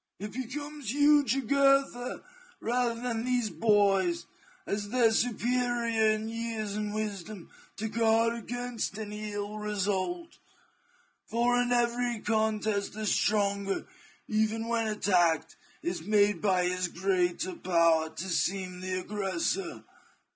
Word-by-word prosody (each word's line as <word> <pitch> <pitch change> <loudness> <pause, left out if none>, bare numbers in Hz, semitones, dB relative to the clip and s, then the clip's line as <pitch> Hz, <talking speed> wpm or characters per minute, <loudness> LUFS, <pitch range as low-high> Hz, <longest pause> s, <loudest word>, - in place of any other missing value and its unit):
It 210 +1 -6
becomes 275 +1 -5
you, 290 +1 +5
Jugurtha, 275 0 +2 0.4
rather 235 0 0
than 235 -2 -2
these 245 -4 0
boys, 190 -2 +2 0.4
as 205 0 -3
their 235 -1 +4
superior 235 -1 +1
in 215 +1 -4
years 225 -2 -3
and 210 0 -2
wisdom, 210 -3 -5 0.3
to 220 - -2
guard 225 +1 +2
against 235 -1 -4
any 210 0 -5
ill 205 +1 -4
result; 210 - -2 0.9
for 245 +1 +2
in 245 0 -1
every 240 -1 +1
contest 215 -1 0
the 215 +1 -4
stronger, 200 -1 +1 0.4
even 220 +1 0
when 230 -1 0
attacked, 180 -6 +2 0.3
is 175 -1 -2
made 205 +2 +2
by 185 -3 +2
his 180 0 0
greater 180 0 0
power 170 -3 +2
to 160 +4 -6
seem 185 +1 -1
the 185 0 -3
aggressor. 205 - -2
215 Hz, 120 wpm, -29 LUFS, 195-235 Hz, 0.9 s, you